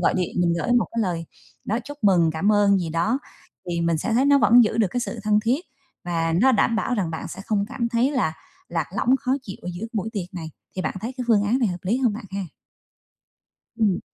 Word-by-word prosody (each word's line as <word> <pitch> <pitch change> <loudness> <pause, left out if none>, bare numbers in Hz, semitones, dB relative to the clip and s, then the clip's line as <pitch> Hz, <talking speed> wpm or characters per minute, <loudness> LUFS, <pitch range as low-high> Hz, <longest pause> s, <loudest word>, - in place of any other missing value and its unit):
gọi 175 - +2
điện 180 -2 -2
mình 175 -1 +3
gửi 245 - 0
một 245 -1 +3
cái 230 - -1
lời, 170 -4 -2 0.4
đó, 220 - 0
chúc 290 +2 -9
mừng, 175 -5 +5
cảm 195 +7 +2
ơn 200 -1 +4
gì 175 -3 -3
đó, 190 - +1 0.5
thì 170 -1 -1
mình 170 -1 +1
sẽ 225 - -2
thấy 255 +4 +3
nó 285 0 +5
vẫn 240 -2 +6
giữ 220 +1 -1
được 215 -4 +3
cái 245 - -1
sự 235 -1 -4
thân 210 0 +3
thiết 240 +7 +1 0.4
và 165 -2 0
nó 265 +3 +5
đảm 225 0 +2
bảo 235 +3 0
rằng 190 -7 -1
bạn 160 - -5
sẽ - - -8
không 205 -2 +1
cảm 235 -1 -2
thấy 235 +3 +2
là 250 - 0 0.4
lạc 165 -3 -1
lõng, 250 - +3
khó 255 - 0
chịu 195 -6 -8
ở 180 - -5
giữa 210 +6 -5
buổi 215 -1 -2
tiệc 190 -3 -5
này. 160 -3 -6 0.3
Thì 185 - -1
bạn - - -2
thấy 230 +5 -4
cái 250 - -3
phương 215 -3 +5
án 225 +5 +2
này 235 -6 +2
hợp 180 - -4
lý 200 +5 +1
hông 245 -5 +2
bạn 215 0 -7
ha? 195 +1 -3 1.4
Ừm. 210 -5 +2
210 Hz, 250 wpm, -23 LUFS, 175-235 Hz, 1.4 s, vẫn